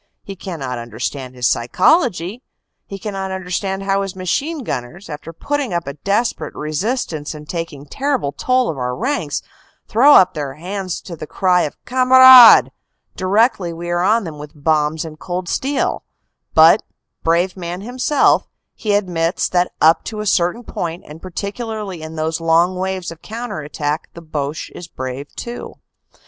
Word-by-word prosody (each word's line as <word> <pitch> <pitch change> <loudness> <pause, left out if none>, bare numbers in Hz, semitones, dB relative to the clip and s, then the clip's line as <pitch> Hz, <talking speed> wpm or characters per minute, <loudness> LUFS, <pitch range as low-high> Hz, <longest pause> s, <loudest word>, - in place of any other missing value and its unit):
He 195 - -8
cannot 140 -10 -5
understand 130 +2 -5
his 125 -1 +1
psychology; 195 - +1 0.5
he 195 - -6
can 205 +1 -6
not 190 0 -3
understand 190 +1 -3
how 195 0 +1
his 195 -2 -4
machine 275 - -2
gunners, 155 - -5
after 150 +2 -7
putting 265 - -2
up 170 - -1
a 140 - -5
desperate 200 - -1
resistance 155 - -3
and 150 0 -11
taking 165 -5 -5
terrible 265 - -1
toll 255 - +1
of 145 - -8
our 125 0 -2
ranks, 275 - -2 0.4
throw 275 +7 +6
up 185 - +6
their 145 -3 -4
hands 185 +2 -5
to 175 - -8
the 155 - -8
cry 180 0 +2
of 150 - -3
"Kamerad" 255 -1 +8 0.4
directly 195 -1 +2
we 170 +1 -5
are 175 0 +1
on 220 +5 +3
them 155 -4 -7
with 150 0 -9
bombs 155 0 +1
and 155 -1 -10
cold 180 +2 -4
steel; 275 +10 -1 0.5
but, - - +7 0.4
brave 170 +3 +1
man 175 0 -5
himself, 255 +6 +2 0.3
he 210 -2 -1
admits 175 -4 0
that 180 0 +1
up 160 +1 +5
to 215 -1 -5
a 210 - -3
certain 180 +4 +1
point 170 -5 -5
and 155 +2 -11
particularly 200 0 -5
in 160 0 -8
those 160 +1 -2
long 165 +3 +3
waves 185 -1 -3
of 165 -1 -12
counter 230 -4 -6
attack 150 +1 -3
the 170 - -9
Boche 150 -1 -4
is 175 - -9
brave 130 -1 -6
too. 240 0 -7
180 Hz, 160 wpm, -19 LUFS, 155-210 Hz, 0.5 s, Kamerad